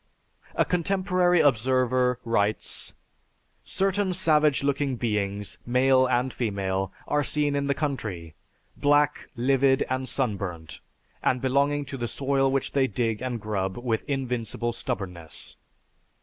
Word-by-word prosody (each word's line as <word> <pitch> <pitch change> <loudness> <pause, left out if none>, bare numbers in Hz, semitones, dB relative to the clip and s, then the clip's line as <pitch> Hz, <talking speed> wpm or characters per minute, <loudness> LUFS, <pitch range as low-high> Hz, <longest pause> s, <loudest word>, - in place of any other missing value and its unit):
A - - +3
contemporary 180 -1 +2
observer 125 -1 +2
writes, 105 -2 0 0.7
"Certain 195 0 0
savage 155 -6 +3
looking 140 -1 0
beings, 105 -3 -2
male 130 +1 +3
and 125 +1 0
female, 95 -4 -2 0.2
are 150 0 +1
seen 145 0 +1
in 140 0 0
the 140 - +1
country, 105 - -3 0.4
black, 145 0 +2
livid, 135 +2 +3
and 130 0 -1
sunburnt, 95 - -3 0.4
and 130 - +1
belonging 140 +3 +1
to 135 - -6
the 120 -1 -2
soil 135 +1 +1
which 135 -1 -1
they 135 -2 +2
dig 115 0 -1
and 125 -2 -3
grub 95 -3 -2
with 120 -2 -1
invincible 120 -4 -2
stubbornness. 90 -7 -5
130 Hz, 120 wpm, -26 LUFS, 110-140 Hz, 0.7 s, A